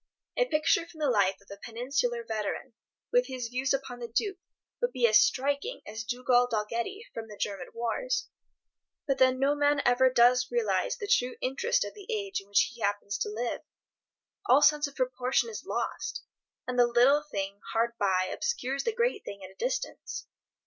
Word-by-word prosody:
A - - +3
picture 325 0 +2
from 325 - -15
the 295 -4 +2
life 200 -4 +2
of 200 - -23
a 200 - -10
Peninsular 240 0 -1
veteran, 220 +3 -4 0.4
with - - +3
his 250 -3 -4
views 255 +2 -1
upon 265 -2 -2
the 240 - -5
Duke, 380 - -1 0.4
would 485 - +1
be 250 -3 +2
as 215 -1 +7
striking 285 - 0
as 220 +2 -6
Dugald 245 +1 +2
Dalgetty 235 - -2
from 225 -1 -6
the 210 -1 -11
German 195 -4 -3
wars. 240 - -1 0.8
But 275 - +1
then 260 0 +5
no 275 +2 +3
man 290 0 +2
ever 250 +1 +5
does 250 0 +4
realize 475 +1 0
the 415 - -5
true 250 -9 +2
interest 475 - 0
of - - -7
the 410 -3 -13
age 405 - -2
in 195 - -20
which 200 +4 +3
he 235 - -14
happens 205 0 -1
to - - -1
live. 230 +3 -3 0.9
All 270 +4 +6
sense 300 -1 +5
of 280 - -13
proportion 255 - 0
is 430 - -8
lost, 460 - -3 0.4
and 250 0 -1
the 240 - +6
little 250 +5 +5
thing 200 -8 -5
hard 230 +1 +2
by 190 -2 +2
obscures 275 - -2
the 460 - -1
great 470 -2 0
thing 200 -1 -8
at 185 - -9
a - - -21
distance. - - -3
255 Hz, 185 wpm, -29 LUFS, 230-300 Hz, 0.9 s, as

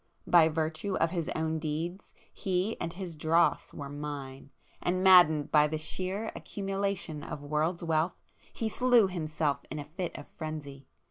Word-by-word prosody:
By 165 -2 +6
virtue 160 +4 -2
of 165 - +1
his 170 -3 -2
own 160 0 -1
deeds 160 +5 -4 0.2
he 190 +3 -1
and 165 - -2
his 175 -2 -6
dross 165 +3 +2
were 145 - -7
Mine! 140 -2 -6 0.3
and 185 +1 0
maddened 175 -6 +7
by 150 0 +6
the 155 +1 -2
sheer 185 +7 -3
accumulation 195 -5 -3
of 145 - -6
world's 155 +4 -1
wealth, 165 +1 +1 0.3
he 225 - -3
slew 240 -1 +4
himself 155 -5 -1
in 155 - -5
a 145 - -5
fit 175 +4 -5
of - - -9
frenzy. 145 -4 -7
160 Hz, 155 wpm, -30 LUFS, 150-185 Hz, 0.3 s, maddened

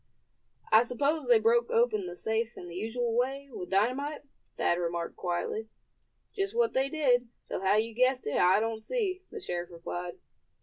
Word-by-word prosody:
"I 220 - +8
suppose 280 +4 0
they 240 -2 +7
broke 230 +2 +3
open 220 -5 +2
the 175 - -6
safe 220 +4 -1
in 175 - -8
the 170 - -9
usual 225 +4 -2
way, 270 +3 -1
with 180 - -7
dynamite?" 255 +10 0 0.3
Thad 175 - +2
remarked, 170 -1 -2
quietly. 180 +5 -3 0.7
"Just 395 +1 -2
what 475 -1 +2
they 265 +1 +1
did, 255 -5 +2 0.2
though - - -3
how 195 +1 +3
you 225 +2 +1
guessed 255 +2 +2
it 145 - -1
I 185 +3 +5
don't 225 0 -2
see," 380 - -1
the 445 - -7
sheriff 175 - -4
replied. 175 +1 -6
230 Hz, 175 wpm, -30 LUFS, 190-270 Hz, 0.7 s, I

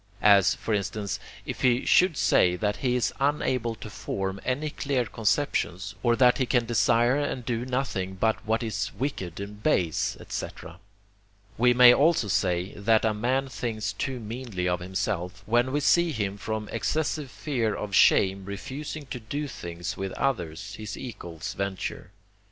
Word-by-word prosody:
As, 100 -2 +6
for 110 - -3
instance, 100 0 -2 0.3
if - - -5
he 125 0 +3
should 180 -5 +4
say 90 0 +4
that 105 +3 -1
he 125 -2 0
is 125 - 0
unable 130 -5 0
to 110 - -9
form 95 -1 -4
any 145 +4 -1
clear 135 -4 -1
conceptions, 105 -4 -1
or 120 -1 +3
that 125 +1 +4
he 130 - +1
can 120 0 +2
desire 120 +2 +3
and 145 -4 -2
do 120 +1 -2
nothing 125 -8 -2
but 110 +3 0
what 110 +2 0
is 110 -4 -2
wicked 95 - -3
and 105 +1 -7
base, 90 - +1
&c. - - -3 1.1
We 125 +1 +4
may 125 0 +9
also 145 -6 +3
say, 90 0 0
that 110 +2 +2
a 110 - +2
man 130 +5 0
thinks 110 -6 -3
too 130 +5 -3
meanly 110 -5 -4
of 90 -1 0
himself, 95 0 -3
when 120 +3 +2
we 145 +2 0
see 170 +4 +4
him 105 -7 -2
from 110 +1 -4
excessive 155 -2 -1
fear 120 -6 -1
of 105 -1 -5
shame 95 0 +4
refusing 140 +9 -6
to 125 - -4
do 145 +7 -4
things 85 -8 -6
which 95 -1 -4
others, 95 - -2
his 110 -1 -6
equals, 85 -10 -7
venture. 100 -2 -4
110 Hz, 165 wpm, -27 LUFS, 100-130 Hz, 1.1 s, may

